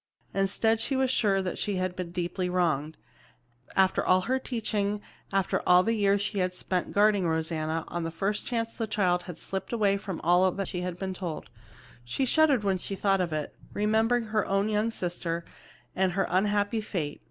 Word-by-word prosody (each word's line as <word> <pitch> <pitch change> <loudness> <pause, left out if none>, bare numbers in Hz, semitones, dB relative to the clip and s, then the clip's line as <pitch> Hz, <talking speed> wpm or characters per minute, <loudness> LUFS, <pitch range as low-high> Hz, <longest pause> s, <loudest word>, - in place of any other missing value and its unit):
Instead, 220 +3 +1
she 270 - 0
was 260 -1 +2
sure 195 -6 +2
that 180 - -3
she 205 - -1
had 185 -1 -1
been 180 -1 -4
very 170 - -13
deeply 180 +1 -2
wronged. 160 -4 0 0.8
After 190 0 +3
all 185 0 +4
her 260 +7 0
teaching, 210 -5 -1 0.3
after 195 -1 +1
all 180 0 +7
the 225 - +1
years 200 -2 +2
she 205 -1 -2
had 180 0 0
spent 180 0 -2
guarding 205 -3 +3
Rosanna, 160 0 -1
on 175 - -3
the 165 - -2
first 195 +5 -2
chance 230 -2 -2
the 225 - -2
child 185 -4 +1
had 175 - -6
slipped 190 -1 -5
away 205 -4 +2
from 195 -3 -5
all 185 +3 +3
she 180 - -4
had 180 -1 -4
been 190 0 -3
told. 175 -9 -6 0.5
She 120 - -1
shuddered 285 -4 +4
when 190 -2 +1
she 195 - -5
thought 195 0 +2
of 175 -2 -1
it, 155 -1 -3 0.2
remembering 220 +3 +2
her 215 -1 0
own 195 +2 +1
young 215 +1 +1
sister 170 -4 -3 0.5
and 185 -1 +1
her 195 - +1
unhappy 205 +3 +1
fate. 165 -8 -4
195 Hz, 190 wpm, -28 LUFS, 180-210 Hz, 0.8 s, all